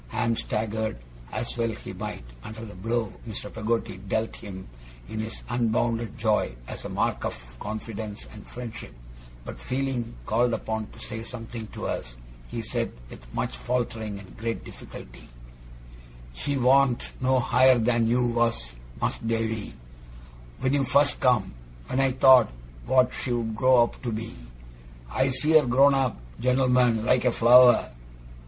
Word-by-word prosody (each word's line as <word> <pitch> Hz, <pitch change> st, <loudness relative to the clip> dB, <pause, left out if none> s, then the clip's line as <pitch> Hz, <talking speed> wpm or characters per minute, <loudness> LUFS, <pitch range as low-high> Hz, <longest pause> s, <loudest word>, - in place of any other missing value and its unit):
Ham 115 Hz, -, 0 dB
staggered, 110 Hz, -, -2 dB, 0.3 s
as -, -, -2 dB
well 115 Hz, 0 st, +2 dB
he 110 Hz, -, -7 dB
might, -, -, -6 dB, 0.2 s
under 110 Hz, +1 st, -8 dB
the 105 Hz, -, -10 dB
blow 115 Hz, +3 st, -2 dB, 0.2 s
Mr. 105 Hz, -1 st, -7 dB
Peggotty 115 Hz, -3 st, -1 dB
dealt 105 Hz, +4 st, -2 dB
him 95 Hz, -2 st, -9 dB, 0.4 s
in 110 Hz, -, -5 dB
his 110 Hz, +1 st, -5 dB
unbounded 115 Hz, -2 st, 0 dB
joy, 110 Hz, -, +1 dB
as -, -, -7 dB
a -, -, -5 dB
mark -, -, -1 dB
of -, -, -2 dB, 0.2 s
confidence 110 Hz, 0 st, -6 dB
and 105 Hz, -, -12 dB
friendship; 115 Hz, -, -8 dB, 0.5 s
but -, -, -7 dB
feeling 130 Hz, -, -2 dB
called 120 Hz, -, +2 dB
upon 110 Hz, -1 st, -3 dB
to -, -, -16 dB
say 110 Hz, +1 st, -6 dB
something 115 Hz, -1 st, -7 dB
to -, -, -7 dB
us, -, -, -4 dB, 0.3 s
he -, -, -5 dB
said, -, -, -2 dB, 0.2 s
with -, -, -13 dB
much 60 Hz, -, -2 dB
faltering 110 Hz, -, -2 dB
and 100 Hz, -1 st, -13 dB
great 115 Hz, +1 st, -3 dB
difficulty: -, -, -11 dB, 1.0 s
'She 140 Hz, -, -2 dB
warn't 130 Hz, 0 st, +3 dB
no 130 Hz, 0 st, +3 dB
higher 125 Hz, +2 st, +5 dB
than 115 Hz, 0 st, +2 dB
you 120 Hz, +2 st, +2 dB
was, 115 Hz, -, 0 dB, 0.3 s
Mas'r -, -, -2 dB
Davy 115 Hz, -1 st, -2 dB, 0.9 s
when 130 Hz, -, +1 dB
you 140 Hz, -1 st, +3 dB
first 140 Hz, +2 st, +3 dB
come 120 Hz, -, +2 dB, 0.3 s
when 130 Hz, -, -2 dB
I 135 Hz, -1 st, +3 dB
thought 130 Hz, -3 st, +7 dB, 0.4 s
what 130 Hz, 0 st, +4 dB
she'd 120 Hz, -3 st, -2 dB
grow 130 Hz, 0 st, +5 dB
up 120 Hz, -, -5 dB
to 120 Hz, -, -3 dB
be. 115 Hz, +1 st, -4 dB, 0.8 s
I 130 Hz, -, +2 dB
see 130 Hz, +4 st, +1 dB
her 145 Hz, -, -1 dB
grown 135 Hz, +3 st, +5 dB
up 130 Hz, -, 0 dB, 0.2 s
gent'lmen 125 Hz, -3 st, +3 dB
like 125 Hz, 0 st, +3 dB
a 125 Hz, -, +3 dB
flower. 120 Hz, +2 st, +6 dB
115 Hz, 150 wpm, -26 LUFS, 110-125 Hz, 1.0 s, thought